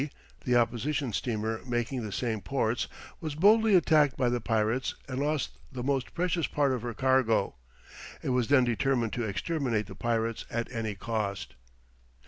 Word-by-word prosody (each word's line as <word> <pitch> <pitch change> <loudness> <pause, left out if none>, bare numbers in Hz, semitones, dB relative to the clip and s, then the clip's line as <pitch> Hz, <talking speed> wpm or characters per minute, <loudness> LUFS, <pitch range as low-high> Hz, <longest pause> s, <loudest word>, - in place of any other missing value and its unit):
the 125 -2 +2
opposition 120 +2 +1
steamer 110 -1 -2
making 120 +1 -2
the 105 - -5
same 110 -1 -2
ports, 120 -2 0 0.3
was 155 -3 -4
boldly 210 +5 +5
attacked 155 -6 +4
by 125 -2 +2
the 120 0 -1
pirates 110 +3 0
and 130 -1 -3
lost 150 0 -1
the 125 -2 -5
most 135 -1 -1
precious 175 -2 0
part 145 -2 +1
of 125 -3 -1
her 120 -1 -4
cargo. 130 -5 +2 0.7
It - - -2
was 125 -2 +1
then 140 -2 +5
determined 120 -1 +1
to 120 - -1
exterminate 115 - -1
the 95 - -10
pirates 115 +2 -1
at 115 +1 -3
any 110 -4 -3
cost. 100 -1 -3
125 Hz, 160 wpm, -29 LUFS, 115-140 Hz, 0.7 s, boldly